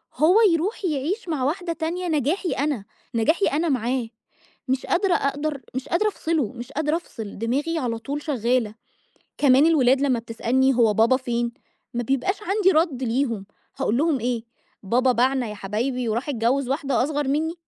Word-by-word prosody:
هو 315 Hz, +8 st, +4 dB, 0.2 s
يروح 375 Hz, +5 st, -1 dB
يعيش 335 Hz, -, -2 dB
مع 285 Hz, -5 st, -1 dB
واحدة 335 Hz, +4 st, -1 dB
تانية 345 Hz, +3 st, -3 dB
نجاحي 320 Hz, +4 st, 0 dB
أنا، 275 Hz, -8 st, -1 dB, 0.3 s
نجاحي 315 Hz, -, +2 dB
أنا 320 Hz, +3 st, 0 dB
معاه. 250 Hz, -1 st, 0 dB, 0.6 s
مش 260 Hz, 0 st, -1 dB
قادرة 370 Hz, +1 st, +2 dB
أقدر 285 Hz, +1 st, -1 dB
مش 260 Hz, -, -4 dB
قادرة 425 Hz, +5 st, +2 dB
أفصله، 315 Hz, -, -1 dB
مش 245 Hz, +2 st, -9 dB
قادرة 305 Hz, +2 st, 0 dB
أفصل، 220 Hz, -, -8 dB
دماغي 285 Hz, +9 st, -1 dB
على 230 Hz, -4 st, -2 dB
طول 285 Hz, +5 st, -5 dB
شغّالة. 245 Hz, -6 st, 0 dB, 0.6 s
كمان 275 Hz, +1 st, +5 dB
الولاد 270 Hz, -4 st, +4 dB
لمّا 260 Hz, -4 st, +2 dB
بتسألني: 255 Hz, +3 st, +1 dB
"هو 230 Hz, -3 st, +3 dB
بابا 230 Hz, +5 st, +4 dB
فين"، 240 Hz, -2 st, -2 dB, 0.4 s
ما 240 Hz, -, -1 dB
بيبقاش 270 Hz, -, 0 dB
عندي 390 Hz, -1 st, +3 dB
رد 310 Hz, -6 st, +1 dB
ليهم. 230 Hz, -4 st, -1 dB, 0.3 s
هاقول 225 Hz, -, 0 dB
لهم 300 Hz, -2 st, +2 dB
إيه؟ 235 Hz, -1 st, -2 dB, 0.4 s
بابا 250 Hz, +6 st, +2 dB
باعنا 255 Hz, +1 st, +1 dB
يا 210 Hz, -, -6 dB
حبايبي 230 Hz, +5 st, -2 dB
وراح 235 Hz, +7 st, -2 dB
اتجوّز 255 Hz, +1 st, 0 dB
واحدة 275 Hz, -2 st, +1 dB
أصغر 290 Hz, 0 st, -1 dB
مِنّي. 310 Hz, +4 st, 0 dB
270 Hz, 165 wpm, -23 LUFS, 240-315 Hz, 0.6 s, كمان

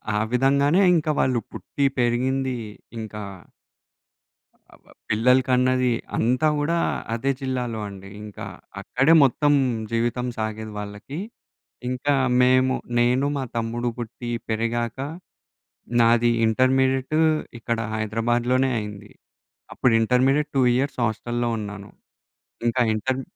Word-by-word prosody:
ఆ -, -, +2 dB
విధంగానే 140 Hz, +7 st, +3 dB
ఇంక 155 Hz, -1 st, 0 dB
వాళ్ళు 125 Hz, -2 st, +2 dB
పుట్టి, 110 Hz, +7 st, -3 dB
పెరిగింది, 130 Hz, +2 st, 0 dB, 0.4 s
ఇంక 110 Hz, -1 st, -6 dB, 1.6 s
అబ్‌బ్ -, -, -27 dB, 0.2 s
పిల్లలకన్నది, 125 Hz, +2 st, +3 dB, 0.3 s
అంతా 125 Hz, +6 st, +2 dB
గూడా 150 Hz, +4 st, 0 dB, 0.4 s
అదే 135 Hz, +4 st, 0 dB
జిల్లాలో 125 Hz, -4 st, -2 dB
అండి. 95 Hz, -1 st, -11 dB
ఇంకా 105 Hz, -1 st, -8 dB, 0.4 s
అక్కడే 135 Hz, +6 st, +3 dB
మొత్తం 145 Hz, +3 st, +2 dB, 0.4 s
జీవితం 120 Hz, +2 st, 0 dB
సాగేది 110 Hz, 0 st, -4 dB
వాళ్ళకి. 105 Hz, +9 st, -7 dB, 0.7 s
ఇంకా 130 Hz, +3 st, 0 dB, 0.3 s
మేము 130 Hz, +1 st, +4 dB, 0.2 s
నేను, 125 Hz, +3 st, +3 dB
మా 135 Hz, -, -2 dB
తమ్ముడు 115 Hz, +1 st, -1 dB
పుట్టి, 120 Hz, 0 st, -6 dB, 0.2 s
పెరిగాక 115 Hz, +2 st, -1 dB, 1.0 s
నాది 120 Hz, +1 st, +4 dB, 0.2 s
ఇంటర్మీడియట్ 130 Hz, +4 st, +2 dB, 0.4 s
ఇక్కడ 115 Hz, 0 st, -2 dB, 0.2 s
హైదరాబాద్లోనే 120 Hz, +4 st, +1 dB
అయింది. 105 Hz, 0 st, -8 dB, 0.6 s
అప్పుడు 125 Hz, -, +2 dB
ఇంటర్మీడియేట్ 135 Hz, +6 st, +2 dB
2 130 Hz, -, +4 dB
ఇయర్స్ 135 Hz, 0 st, -1 dB
హాస్టల్‌‌లో 120 Hz, +2 st, -1 dB
ఉన్నాను. 105 Hz, -1 st, -7 dB, 0.8 s
ఇంకా 125 Hz, +2 st, +1 dB
ఇంటర్ 130 Hz, +5 st, -1 dB
125 Hz, 105 wpm, -23 LUFS, 115-130 Hz, 1.6 s, మేము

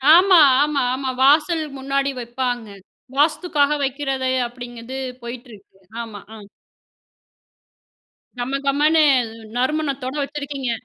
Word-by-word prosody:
ஆமா, 365 Hz, -1 st, +6 dB, 0.2 s
ஆமா, 295 Hz, -1 st, 0 dB
ஆமா. 265 Hz, 0 st, -3 dB
வாசல் 310 Hz, +4 st, +4 dB
முன்னாடி 275 Hz, +1 st, -1 dB
வைப்பாங்க. 245 Hz, -1 st, -3 dB, 0.5 s
வாஸ்துக்காக 300 Hz, -1 st, +2 dB
வக்கிறது 270 Hz, -1 st, -1 dB, 0.2 s
அப்படிங்கிறது 240 Hz, +1 st, -9 dB, 0.3 s
போயிட்டு 240 Hz, +1 st, -8 dB
இருக்கு. 195 Hz, -1 st, -18 dB, 0.3 s
ஆமா. 215 Hz, -3 st, -9 dB, 0.2 s
ஆ. -, -, -10 dB, 2.0 s
கமகமன்னு, 280 Hz, +5 st, +2 dB, 0.5 s
நறுமணத்தோட 275 Hz, 0 st, -1 dB
வச்சிருக்கீங்க. 280 Hz, -3 st, -4 dB
275 Hz, 90 wpm, -21 LUFS, 250-295 Hz, 2.0 s, ஆமா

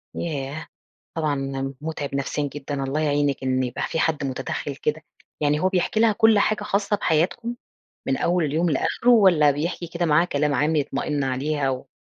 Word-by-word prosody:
ياه! 150 Hz, -1 st, -4 dB, 0.5 s
طبعًا 135 Hz, -3 st, -2 dB
مُتعِب 150 Hz, -3 st, -4 dB
نفسيًا 140 Hz, +1 st, -2 dB
جدًا، 140 Hz, -1 st, -4 dB
الله 140 Hz, +3 st, -1 dB
يعينِك، 145 Hz, -2 st, 0 dB
إن 130 Hz, 0 st, +1 dB
يبقى 125 Hz, -1 st, -4 dB
فيه 160 Hz, -, -2 dB
حد 155 Hz, -3 st, 0 dB
مُتدخِّل 130 Hz, -1 st, -3 dB
كده. -, -, -2 dB, 0.4 s
يعني 150 Hz, 0 st, +2 dB
هو 185 Hz, -, +2 dB
بيحكي 190 Hz, +3 st, 0 dB
لها 230 Hz, -1 st, +5 dB
كُلّ 220 Hz, 0 st, +4 dB
حاجة 210 Hz, +1 st, +1 dB
خاصة 205 Hz, 0 st, 0 dB
بحياتكم؟ 190 Hz, +8 st, 0 dB, 0.5 s
من 135 Hz, -, +1 dB
أول 175 Hz, -1 st, +1 dB
اليوم 160 Hz, +4 st, +1 dB
لآخره 200 Hz, -, 0 dB
والَّا 180 Hz, -10 st, +6 dB
بيحكي 165 Hz, +4 st, -3 dB
كده 170 Hz, +1 st, -2 dB
معاها 165 Hz, +2 st, +4 dB
كلام 145 Hz, -3 st, 0 dB
عام 150 Hz, +3 st, +1 dB
يطمئن 145 Hz, 0 st, -1 dB
عليها 135 Hz, +2 st, -1 dB
و 130 Hz, +1 st, -4 dB
150 Hz, 170 wpm, -23 LUFS, 140-175 Hz, 0.5 s, والَّا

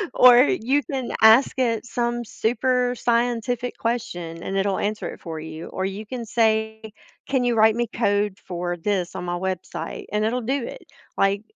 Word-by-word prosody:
Or 250 Hz, -1 st, +8 dB
you 270 Hz, +1 st, +1 dB
can 265 Hz, -6 st, -4 dB
ask 225 Hz, +5 st, +6 dB
it 230 Hz, -3 st, 0 dB
some 240 Hz, 0 st, -2 dB
super 250 Hz, +3 st, 0 dB
scientific 240 Hz, +1 st, 0 dB
question, 175 Hz, -8 st, -3 dB
and 195 Hz, -, -3 dB
it'll 195 Hz, 0 st, 0 dB
answer 210 Hz, +1 st, -2 dB
it -, -, -10 dB
for 160 Hz, -2 st, -6 dB
you, 160 Hz, +1 st, -8 dB
or 190 Hz, -, -3 dB
you 195 Hz, +3 st, -5 dB
can 240 Hz, 0 st, -5 dB
say, 220 Hz, -1 st, +1 dB, 0.5 s
"Can 265 Hz, -2 st, +1 dB
you 240 Hz, -1 st, +1 dB
write 220 Hz, 0 st, +5 dB
me 240 Hz, 0 st, 0 dB
code 205 Hz, -3 st, +1 dB
for 175 Hz, -1 st, -4 dB
this 180 Hz, 0 st, -2 dB
on -, -, -4 dB
my 175 Hz, 0 st, -2 dB
website?" 185 Hz, 0 st, -5 dB
And 210 Hz, +1 st, +1 dB
it'll 245 Hz, +3 st, 0 dB
do 265 Hz, +3 st, -1 dB
it, -, -, -9 dB, 0.3 s
like, 200 Hz, +2 st, +2 dB
220 Hz, 175 wpm, -23 LUFS, 195-245 Hz, 0.5 s, Or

